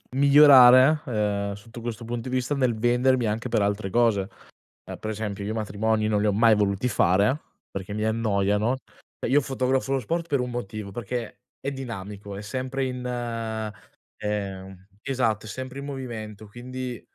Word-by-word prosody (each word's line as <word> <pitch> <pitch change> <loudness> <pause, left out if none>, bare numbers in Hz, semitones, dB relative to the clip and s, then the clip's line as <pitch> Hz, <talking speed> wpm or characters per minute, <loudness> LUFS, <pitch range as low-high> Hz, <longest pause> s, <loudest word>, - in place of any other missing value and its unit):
migliorare, 140 0 +8
ehm, 105 -4 -1
sotto 115 +4 -11
questo 115 0 -5
punto 120 +1 -4
di 130 - -1
vista 130 +3 0
nel 130 -3 +2
vendermi 120 +2 +2
anche 110 +3 -2
per 115 -3 +1
altre 100 -1 -1
cose. 110 -5 +2 0.6
Ehm, - - -8
per 110 - -4
esempio 105 -2 -4
io 110 - -2
matrimoni 110 0 0
non 105 -1 +2
li 105 - +1
ho 105 - +2
mai 110 +2 +5
voluti 105 +3 +1
fare 105 - +3 0.3
perché 100 +1 -5
mi 105 +1 -2
annoiano. 110 +1 +1 0.4
Cioè - - -2
io 145 - +6
fotografo 135 0 0
lo 135 - +1
sport 165 +8 -2
per 140 -5 +1
un 125 - -3
motivo, 110 -4 -5
perché 120 +2 -5 0.2
è 140 - -2
dinamico, 105 -6 -7
è 100 - -6
sempre 130 +5 -3
in, 125 -1 -4 1.1
ehm 95 -2 -5 0.2
esatto, 115 -5 0
è - - -8
sempre 130 +4 -6
in 140 - -6
movimento, 110 -6 -6
quindi 125 +1 -6
115 Hz, 170 wpm, -25 LUFS, 105-130 Hz, 1.1 s, migliorare